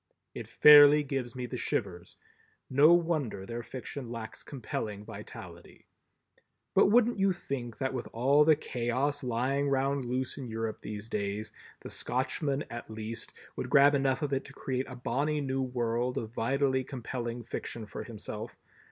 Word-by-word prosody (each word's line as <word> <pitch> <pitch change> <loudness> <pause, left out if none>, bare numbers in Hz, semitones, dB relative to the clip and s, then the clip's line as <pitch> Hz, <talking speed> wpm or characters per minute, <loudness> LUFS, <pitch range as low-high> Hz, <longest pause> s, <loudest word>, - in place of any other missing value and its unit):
It - - -7
fairly 150 0 +8
gives 135 -4 -3
me 125 -1 -4
the 125 +1 -5
shivers. 90 -7 -3 0.5
No 145 +5 +6
wonder 160 - +1
their 115 +3 -5
fiction 130 +1 -7
lacks 115 -2 -7
compelling 110 -6 -5
vitality! - - -11 0.9
But - - +6
wouldn't 235 +1 +4
you 195 0 +4
think 135 -9 -5
that 135 -1 -2
with 125 -2 -4
all 135 +6 +4
the 155 0 +6
Chaos 135 +2 -1
lying 130 +4 0
round 135 0 +1
loose 130 +3 -2
in 130 - -6
Europe 110 -1 -4
these 105 0 -6
days, 105 0 -3 0.3
the - - -8
Scotchman 135 +2 -1
at 120 -1 -7
least 110 +1 -6 0.2
would - - -4
grab 140 +1 +6
enough 135 +1 +1
of 145 -1 -1
it 135 - 0
to 140 - -12
create 130 -1 -3
a 130 - -7
bonnie 145 +4 -1
new 135 -1 -1
world 120 -1 -1
of 110 -1 -4
vitally 130 +3 +1
compelling 120 -2 -5
fiction 115 0 -5
for 105 - -7
himself? 110 -1 -7
130 Hz, 160 wpm, -30 LUFS, 115-140 Hz, 0.9 s, fairly